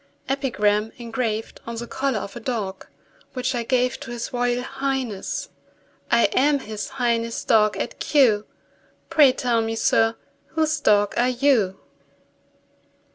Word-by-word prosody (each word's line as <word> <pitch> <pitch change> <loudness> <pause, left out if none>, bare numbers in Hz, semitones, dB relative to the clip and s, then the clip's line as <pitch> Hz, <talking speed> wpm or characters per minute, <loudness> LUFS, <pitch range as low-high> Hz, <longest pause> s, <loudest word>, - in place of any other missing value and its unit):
EPIGRAM, 220 -6 +1
ENGRAVED 230 -2 -3
ON 235 - -4
THE 235 +1 -5
COLLAR 265 0 -1
OF 200 - -8
A - - -5
DOG 215 -6 -4 0.5
WHICH 255 0 -1
I 240 - -1
GAVE 250 +1 0
TO 280 - -9
HIS 240 0 -5
ROYAL 245 0 0
HIGHNESS. 265 -6 -3 0.6
I 235 0 +4
am 290 +2 +3
His 215 -2 -6
Highness' 230 -2 0
dog 215 -2 +3
at - - -4
Kew; 230 -8 +3 0.6
Pray 290 -4 +7
tell 245 -3 0
me, 225 0 -2
sir, 225 0 +2 0.4
whose 315 -1 +1
dog 205 -6 +3
are 245 +1 +3
you? 245 -7 +2
240 Hz, 135 wpm, -23 LUFS, 220-260 Hz, 0.6 s, Pray